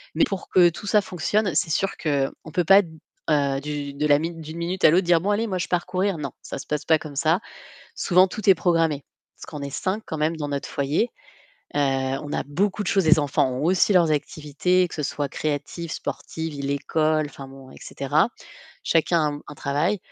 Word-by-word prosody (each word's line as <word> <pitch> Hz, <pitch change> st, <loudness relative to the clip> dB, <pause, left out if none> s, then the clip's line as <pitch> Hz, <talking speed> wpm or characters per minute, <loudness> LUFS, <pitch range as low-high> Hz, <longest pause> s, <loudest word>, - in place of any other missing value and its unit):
mais -, -, +4 dB
pour 195 Hz, -8 st, -5 dB
que 175 Hz, -2 st, +6 dB
tout 175 Hz, -, -9 dB
ça 210 Hz, +1 st, +4 dB
fonctionne, 195 Hz, 0 st, -1 dB
c'est 160 Hz, -, +1 dB
sûr 195 Hz, +6 st, 0 dB
qu'on 145 Hz, 0 st, -2 dB
peut 175 Hz, +1 st, +1 dB
pas 195 Hz, +4 st, +7 dB
d 170 Hz, -, -11 dB, 0.4 s
heu, 140 Hz, -2 st, +2 dB
du 145 Hz, -1 st, -5 dB
de 150 Hz, +2 st, -1 dB
la 145 Hz, -1 st, +5 dB
mi 165 Hz, +3 st, -3 dB
d'une 160 Hz, 0 st, -9 dB
minute 180 Hz, +2 st, -3 dB
à -, -, +9 dB
l'autre 175 Hz, +3 st, +3 dB
dire: 170 Hz, -1 st, +4 dB
«Bon 200 Hz, -, -1 dB
allez, 215 Hz, +3 st, +1 dB
moi 190 Hz, -4 st, -2 dB
je 180 Hz, -, -3 dB
pars 175 Hz, -1 st, 0 dB
courir», 185 Hz, 0 st, -1 dB
non, 140 Hz, -3 st, -5 dB
ça -, -, -6 dB
se -, -, -9 dB
passe 150 Hz, -1 st, -2 dB
pas 160 Hz, -1 st, +4 dB
comme 145 Hz, -2 st, -9 dB
ça. 160 Hz, +5 st, +2 dB, 0.5 s
Souvent 185 Hz, +1 st, +4 dB
tout 210 Hz, +3 st, -4 dB
est -, -, +8 dB
programmé 165 Hz, -5 st, +1 dB, 0.3 s
parce -, -, -11 dB
qu'on 150 Hz, -2 st, -7 dB
est -, -, -7 dB
5 195 Hz, +9 st, -2 dB
quand 160 Hz, -, -5 dB
même 155 Hz, +2 st, 0 dB
dans 150 Hz, -2 st, -4 dB
notre 140 Hz, -1 st, -3 dB
foyer. 145 Hz, -, 0 dB, 0.7 s
Heu, -, -, 0 dB
on 135 Hz, +1 st, -1 dB
a -, -, -1 dB
beaucoup 195 Hz, +8 st, 0 dB
de 180 Hz, -, -3 dB
choses, 195 Hz, -4 st, +2 dB
les 160 Hz, +1 st, +6 dB
enfants 145 Hz, -3 st, +1 dB
ont 130 Hz, +3 st, -3 dB
aussi 185 Hz, +4 st, +3 dB
leurs 170 Hz, -3 st, +4 dB
activités, 155 Hz, +5 st, 0 dB
que -, -, -9 dB
ce 150 Hz, -, -3 dB
soit 145 Hz, 0 st, -2 dB
créatives, 155 Hz, +4 st, -4 dB
sportives, 160 Hz, 0 st, -5 dB
l'école, 155 Hz, +2 st, 0 dB
enfin 135 Hz, -1 st, -10 dB
bon, 135 Hz, -1 st, -13 dB
et -, -, -14 dB
cetera. 150 Hz, +8 st, 0 dB, 0.6 s
Chacun 155 Hz, -3 st, +2 dB
a -, -, -9 dB
un -, -, -10 dB
travail. 150 Hz, +10 st, 0 dB
160 Hz, 220 wpm, -24 LUFS, 145-180 Hz, 0.7 s, à